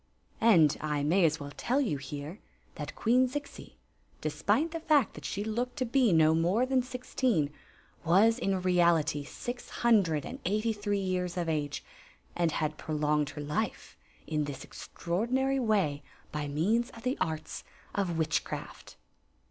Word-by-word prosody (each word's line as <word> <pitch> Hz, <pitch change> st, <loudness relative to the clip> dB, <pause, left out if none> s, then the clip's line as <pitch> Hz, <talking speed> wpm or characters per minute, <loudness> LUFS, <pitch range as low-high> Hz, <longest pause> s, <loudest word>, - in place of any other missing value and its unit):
And 170 Hz, -10 st, +5 dB
I 150 Hz, -2 st, -1 dB
may 170 Hz, +5 st, +4 dB
as 155 Hz, 0 st, +1 dB
well 145 Hz, 0 st, -7 dB
tell 255 Hz, +4 st, 0 dB
you 225 Hz, -, 0 dB
here 145 Hz, +7 st, -7 dB, 0.3 s
that -, -, -7 dB
Queen 250 Hz, +3 st, +3 dB
Zixi, 290 Hz, +2 st, -7 dB, 0.4 s
despite 320 Hz, +3 st, 0 dB
the 330 Hz, -, -3 dB
fact 300 Hz, -7 st, +3 dB
that -, -, -10 dB
she 200 Hz, -, -2 dB
looked 240 Hz, +3 st, -2 dB
to 255 Hz, -, 0 dB
be 245 Hz, -2 st, +3 dB
no 160 Hz, -1 st, +5 dB
more 175 Hz, +9 st, +2 dB
than 260 Hz, 0 st, +2 dB
sixteen, 245 Hz, -, -1 dB, 0.5 s
was 205 Hz, +8 st, +4 dB
in 195 Hz, -5 st, 0 dB
reality 170 Hz, -5 st, +3 dB
six 245 Hz, -, -7 dB
hundred 195 Hz, -11 st, +2 dB
and -, -, -8 dB
eighfy 215 Hz, +4 st, 0 dB
three 205 Hz, 0 st, -1 dB
years 185 Hz, -2 st, -2 dB
of 175 Hz, -1 st, -1 dB
age, 150 Hz, -3 st, -2 dB, 0.5 s
and 170 Hz, -3 st, +1 dB
had 155 Hz, -1 st, -2 dB
prolonged 150 Hz, -1 st, 0 dB
her 150 Hz, 0 st, -7 dB
life 150 Hz, +10 st, -3 dB, 0.3 s
in 155 Hz, -1 st, -1 dB
diis 145 Hz, -2 st, -6 dB
ex -, -, -11 dB
traordinary 255 Hz, +10 st, 0 dB
way 195 Hz, -, +1 dB, 0.3 s
by 150 Hz, -1 st, -3 dB
means 210 Hz, -, +1 dB
of 230 Hz, -, -12 dB
the 255 Hz, +2 st, 0 dB
arts 155 Hz, -1 st, -3 dB, 0.3 s
of 185 Hz, -5 st, -1 dB
witchcraft. 160 Hz, -1 st, -3 dB
185 Hz, 155 wpm, -30 LUFS, 155-235 Hz, 0.5 s, And